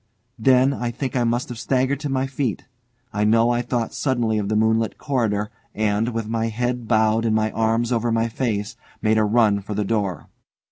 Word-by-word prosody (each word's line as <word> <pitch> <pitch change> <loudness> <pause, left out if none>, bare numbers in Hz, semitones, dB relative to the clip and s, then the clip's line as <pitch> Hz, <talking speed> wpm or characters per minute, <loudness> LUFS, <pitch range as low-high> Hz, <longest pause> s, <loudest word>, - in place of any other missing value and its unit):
Then 130 +3 +4
I 120 -3 -3
think 130 +2 -4
I 125 - +2
must 120 +1 0
have 120 -2 -6
staggered 130 +2 0
to 145 -1 -4
my 135 0 0
feet. 135 -5 -3 0.5
I 105 - 0
know 115 +2 +4
I 120 0 +1
thought 120 -1 -2
suddenly 120 -5 0
of 100 -1 -3
the 110 - 0
moonlit 110 +1 +1
corridor, 110 -7 -1 0.2
and, 110 +2 +1
with 115 -2 -3
my 115 0 -1
head 120 +1 -2
bowed 110 0 +3
and 110 -1 +1
my 110 0 +1
arms 115 +2 0
over 120 -1 +1
my 115 0 +1
face, 115 -2 -2 0.3
made 110 0 +3
a - - +3
run 105 -1 +3
for 100 +2 -6
the 105 0 -1
door. 100 -6 -2
115 Hz, 200 wpm, -22 LUFS, 110-125 Hz, 0.5 s, Then